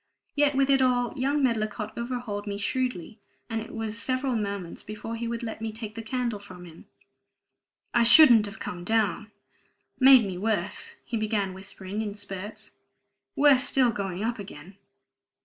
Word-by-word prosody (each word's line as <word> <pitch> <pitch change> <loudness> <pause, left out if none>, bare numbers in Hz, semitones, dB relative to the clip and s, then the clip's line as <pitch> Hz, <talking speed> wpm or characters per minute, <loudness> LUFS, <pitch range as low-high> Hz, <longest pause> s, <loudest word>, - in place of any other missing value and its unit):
Yet 290 -1 +3
with 275 0 +3
it 270 -1 +4
all, 245 -2 +2
young 280 +2 0
Medlicott 215 -3 -1
overhauled 235 -4 -4
me 200 0 -3
shrewdly, 230 -2 -3 0.3
and 225 0 -1
it 225 - -9
was 225 0 -3
several 255 0 -1
moments 200 -5 -4
before 215 +2 -6
he 230 +1 -4
would 235 0 -4
let 225 -1 -5
me 225 0 -3
take 220 -1 -6
the 225 - -6
candle 235 -1 -2
from 185 -3 -12
him. 165 -2 -14 1.1
"I 235 - +4
shouldn't 235 -3 +7
have 205 +2 -9
come 175 -4 -6
down 215 0 0 0.7
made 260 -3 +8
me 185 -2 -5
worse," 205 -2 -2
he 235 - -3
began 210 -3 -1
whispering 190 +1 -6
in 205 -2 -4
spurts. 200 0 -7 0.6
"Worse 280 -3 +5
still 255 -3 +3
going 195 -2 -4
up 230 0 -2
again. 190 -2 -10
220 Hz, 165 wpm, -27 LUFS, 205-245 Hz, 1.1 s, made